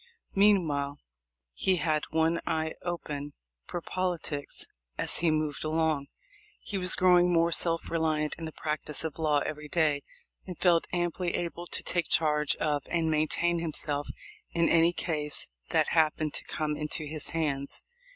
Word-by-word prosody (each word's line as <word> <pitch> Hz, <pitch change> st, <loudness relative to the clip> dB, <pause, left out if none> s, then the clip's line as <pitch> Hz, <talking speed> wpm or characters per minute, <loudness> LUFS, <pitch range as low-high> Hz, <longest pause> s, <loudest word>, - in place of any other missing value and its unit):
Meanwhile, 160 Hz, -9 st, +3 dB, 0.6 s
he 190 Hz, -, +2 dB
had 155 Hz, -3 st, 0 dB
one 160 Hz, +1 st, +1 dB
eye 160 Hz, 0 st, 0 dB
open 150 Hz, -5 st, -4 dB, 0.3 s
for 175 Hz, -, -4 dB
politics 170 Hz, -6 st, -2 dB, 0.3 s
as -, -, +3 dB
he 170 Hz, -, +3 dB
moved 155 Hz, -2 st, -1 dB
along. 155 Hz, -2 st, 0 dB, 0.5 s
He 200 Hz, -, -4 dB
was 180 Hz, 0 st, +5 dB
growing 180 Hz, -1 st, +5 dB
more 170 Hz, 0 st, +3 dB
self 165 Hz, 0 st, +1 dB
reliant 155 Hz, -2 st, 0 dB
in 165 Hz, -, -4 dB
the 160 Hz, -, -5 dB
practice 150 Hz, -1 st, -2 dB
of 160 Hz, -1 st, -5 dB
law 150 Hz, -2 st, +2 dB
every 150 Hz, 0 st, -5 dB
day, 150 Hz, -3 st, +2 dB, 0.5 s
and 180 Hz, -3 st, -6 dB
felt 170 Hz, -2 st, +3 dB
amply 175 Hz, 0 st, -1 dB
able 175 Hz, 0 st, -4 dB
to -, -, 0 dB
take 175 Hz, -2 st, -1 dB
charge 150 Hz, -2 st, +3 dB
of 150 Hz, -2 st, 0 dB
and 165 Hz, -2 st, 0 dB
maintain 160 Hz, +3 st, +1 dB
himself 150 Hz, -3 st, -2 dB, 0.5 s
in 170 Hz, -1 st, +3 dB
any 165 Hz, +1 st, +5 dB
case 150 Hz, -4 st, -2 dB, 0.2 s
that -, -, +2 dB
happened 155 Hz, -2 st, +2 dB
to -, -, -4 dB
come 150 Hz, -1 st, -2 dB
into 150 Hz, +1 st, -3 dB
his 155 Hz, 0 st, -4 dB
hands. 145 Hz, -4 st, -2 dB
160 Hz, 150 wpm, -29 LUFS, 150-170 Hz, 0.6 s, was